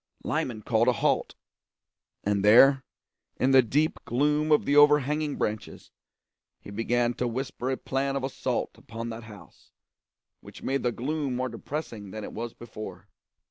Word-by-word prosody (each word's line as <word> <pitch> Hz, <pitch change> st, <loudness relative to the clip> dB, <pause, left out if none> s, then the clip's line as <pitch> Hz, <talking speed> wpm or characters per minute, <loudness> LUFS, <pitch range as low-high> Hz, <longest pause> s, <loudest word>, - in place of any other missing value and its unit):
Lyman 110 Hz, -4 st, -2 dB
called 115 Hz, +2 st, +2 dB
a 125 Hz, -, +5 dB
halt; 105 Hz, -, 0 dB, 0.9 s
and 100 Hz, -1 st, 0 dB
there, 130 Hz, +6 st, +7 dB, 0.5 s
in 130 Hz, -, +2 dB
the 135 Hz, -1 st, +8 dB
deep 145 Hz, +7 st, 0 dB
gloom 150 Hz, +5 st, +1 dB
of 150 Hz, -, +4 dB
the 145 Hz, -, +2 dB
overhanging 150 Hz, 0 st, +4 dB
branches, 105 Hz, 0 st, -4 dB, 0.7 s
he -, -, -11 dB
began 120 Hz, +3 st, 0 dB
to 125 Hz, -, -2 dB
whisper 130 Hz, +1 st, -3 dB
a 130 Hz, -, -1 dB
plan 135 Hz, +1 st, -2 dB
of 135 Hz, -, -2 dB
assault 135 Hz, -, -3 dB
upon 115 Hz, +1 st, -7 dB
that 115 Hz, 0 st, -8 dB
house, 105 Hz, -2 st, -15 dB, 0.7 s
which -, -, -13 dB
made 135 Hz, +1 st, 0 dB
the 120 Hz, -, +1 dB
gloom 140 Hz, +2 st, -2 dB
more 130 Hz, +1 st, -1 dB
depressing 115 Hz, -4 st, -6 dB
than 110 Hz, +2 st, -7 dB
it -, -, -7 dB
was 115 Hz, +1 st, -5 dB
before. 110 Hz, -5 st, -9 dB
125 Hz, 155 wpm, -27 LUFS, 115-140 Hz, 0.9 s, the